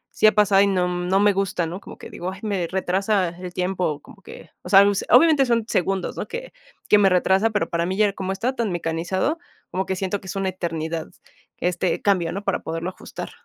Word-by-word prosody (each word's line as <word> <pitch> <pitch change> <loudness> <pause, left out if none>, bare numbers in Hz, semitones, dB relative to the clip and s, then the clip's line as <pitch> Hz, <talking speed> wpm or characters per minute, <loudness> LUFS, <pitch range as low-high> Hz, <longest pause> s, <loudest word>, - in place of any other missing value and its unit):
sí 215 - +5
ha - - +7
pasado 200 -2 +5
y 200 - +4
no 180 -2 +1
no 180 +2 0
me 205 0 +4
gusta, 190 -3 -1
¿no?, 175 +4 -6
como - - -11
que - - -11
digo, 180 +2 -5
ay, 190 - -10
me 195 -5 -1
retrasa 190 +1 0
el 180 +1 -8
tiempo, 180 -4 -1
como 200 +5 -17
que, - - -13
o - - -9
sea, 195 +1 +8
pues, 200 -1 +1
obviamente 275 +2 +6
son 230 -2 +1
segundos, 190 0 -1
¿no?, - - -4
que - - -7 0.3
que 210 - +6
me 195 -1 +5
retrasa, 190 +4 +3
pero 210 -1 -1
para 170 0 -1
mí 190 - -2
ya 205 -2 +3
como 190 -1 -4
está 250 +7 -2
tan 225 -6 -1
mecanizado, 175 - -1 0.3
como 190 +1 -2
que 190 - -1
siento 190 +1 -3
que 190 - -12
es - - -6
una 195 -1 -1
eternidad 165 -3 -4 0.5
este 180 0 -1
cambio, 180 -5 +2
¿no?, 200 +2 -5
para 195 - 0
poderlo 165 +2 -4
ajustar. - - -9
190 Hz, 230 wpm, -23 LUFS, 180-205 Hz, 0.5 s, sea